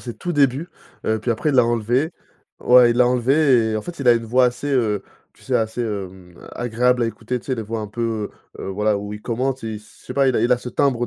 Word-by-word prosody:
ses 120 -2 -7
tout 175 - -4
débuts, 140 +2 +1 0.4
heu, 110 0 +1
puis 120 - -2
après 120 +7 0
il - - -2
l'a 125 -2 +6
enlevée. 120 - 0 0.5
Ouais 125 -1 +6
il 120 - 0
l'a 125 - +5
enlevée, 125 -2 +3
et - - 0
en 110 - -3
fait 175 +4 -8
il 130 - +1
a 120 - +9
une 115 -1 0
voix 125 +3 +3
assez, 125 +3 -3
heu, 105 -6 +1 0.3
tu - - -22
sais - - -2
assez, 110 +2 0
hem, 95 -5 -5 0.2
agréable 120 +1 +1
à - - +1
écouter 115 +2 -4
tu - - -19
sais? 130 - 0
Les 115 - -4
voix 115 +2 -4
un 105 - -4
peu, 110 -1 -3 0.3
heu, - - -6
voilà 105 +2 0
où 105 +1 -6
il 105 0 -8
commente 130 +3 -2
il 110 -1 -4
s 105 0 -16
je - - -21
sais - - -5
pas, 140 -1 +3
il 130 - +2
a - - +2
il 120 +2 +1
a 125 - +4
ce 125 - -7
timbre 125 -2 +1
120 Hz, 275 wpm, -21 LUFS, 110-125 Hz, 0.5 s, a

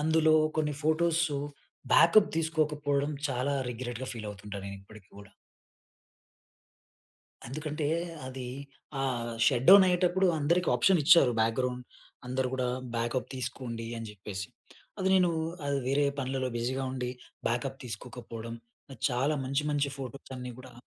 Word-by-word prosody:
అందులో 160 +1 +4 0.2
కొన్ని 150 -1 +1
photos 160 0 +2 0.6
backup 170 +6 +7
తీసుకోకపోవడం, 150 -3 0 0.2
చాలా 135 +2 0 0.2
రిగ్రెట్‌గా 120 +1 -5
ఫీల్ 110 -3 -6
అవుతుంటా, 100 0 -8
నేను 100 0 -6
ఇప్పటికి 100 -1 -15
కూడా. 100 -1 -13 2.2
ఎందుకంటే, 150 +2 -3 0.4
అది 130 -1 -6 0.5
ఆహ్, 120 -3 -1 0.2
షట్‌డౌన్ 185 +10 +7
అయ్యేటప్పుడు 180 +1 +3
అందరికి 170 +5 +2
ఆప్షన్ 190 -4 +4
ఇచ్చారు. 165 -4 +7
బ్యాక్గ్రౌండ్, 125 +3 0 0.5
అందరు 130 +1 0
కూడా 130 -1 0 0.3
బ్యాకప్ 120 +2 -1
తీసుకోండి, 125 -3 -5
అని 115 - -6
చెప్పేసి. 100 0 -6 0.5
అది 190 - +1
నేను 180 -2 +4 0.6
వేరే 145 +2 +3
పనులలో 130 -1 -1
బిజీగా 130 +3 -1
ఉండి, 125 -1 -3 0.4
బ్యాకప్ 130 +3 -2
తీసుకోకపోవడం, 115 0 -7 0.5
చాలా 135 +5 +1
మంచి 140 +3 0
మంచి 145 -1 +1
ఫోటోస్ 135 0 -8
అన్ని 125 0 -6
కూడా 130 -1 -12
130 Hz, 120 wpm, -30 LUFS, 120-155 Hz, 2.2 s, బ్యాకప్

